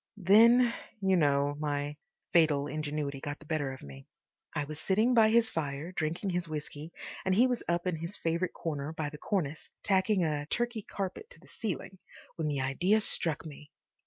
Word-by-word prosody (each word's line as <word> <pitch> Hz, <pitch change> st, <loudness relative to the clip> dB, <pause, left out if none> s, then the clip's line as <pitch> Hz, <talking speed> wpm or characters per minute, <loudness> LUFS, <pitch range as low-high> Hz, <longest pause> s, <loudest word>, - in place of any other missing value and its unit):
Then, 230 Hz, +5 st, +6 dB, 0.3 s
you 190 Hz, -1 st, +3 dB
know, 145 Hz, -3 st, +3 dB
my 145 Hz, -1 st, -2 dB, 0.4 s
fatal 155 Hz, -4 st, +4 dB
ingenuity 145 Hz, -1 st, -3 dB
got 145 Hz, +1 st, -4 dB
the 155 Hz, -, -16 dB
better 150 Hz, -3 st, -1 dB
of 130 Hz, -, -9 dB
me. 70 Hz, -1 st, -11 dB, 0.5 s
I 150 Hz, -, 0 dB
was 155 Hz, +1 st, -7 dB
sitting 215 Hz, +8 st, +2 dB
by 225 Hz, -2 st, +6 dB
his 230 Hz, 0 st, +4 dB
fire 150 Hz, -1 st, -3 dB
drinking 175 Hz, +3 st, -2 dB
his 175 Hz, -1 st, -1 dB
whisky, 150 Hz, 0 st, -6 dB, 0.3 s
and 190 Hz, 0 st, +2 dB
he 240 Hz, +5 st, +6 dB
was 250 Hz, -2 st, 0 dB
up 170 Hz, +1 st, 0 dB
in 180 Hz, -3 st, 0 dB
his 170 Hz, +5 st, -5 dB
favourite 170 Hz, +2 st, -1 dB
corner 150 Hz, -2 st, -3 dB
by 155 Hz, -2 st, -3 dB
the 150 Hz, -, -9 dB
cornice, 165 Hz, -7 st, -2 dB
tacking 195 Hz, -1 st, +3 dB
a 150 Hz, -2 st, -1 dB
Turkey 240 Hz, +3 st, -1 dB
carpet 200 Hz, -, -5 dB
to -, -, -14 dB
the -, -, -19 dB
ceiling, 190 Hz, -3 st, -4 dB, 0.4 s
when 160 Hz, -2 st, -2 dB
the 145 Hz, -2 st, 0 dB
idea 175 Hz, +11 st, +2 dB
struck 165 Hz, -7 st, -1 dB
me. 150 Hz, -1 st, -10 dB
165 Hz, 185 wpm, -31 LUFS, 145-195 Hz, 0.5 s, Then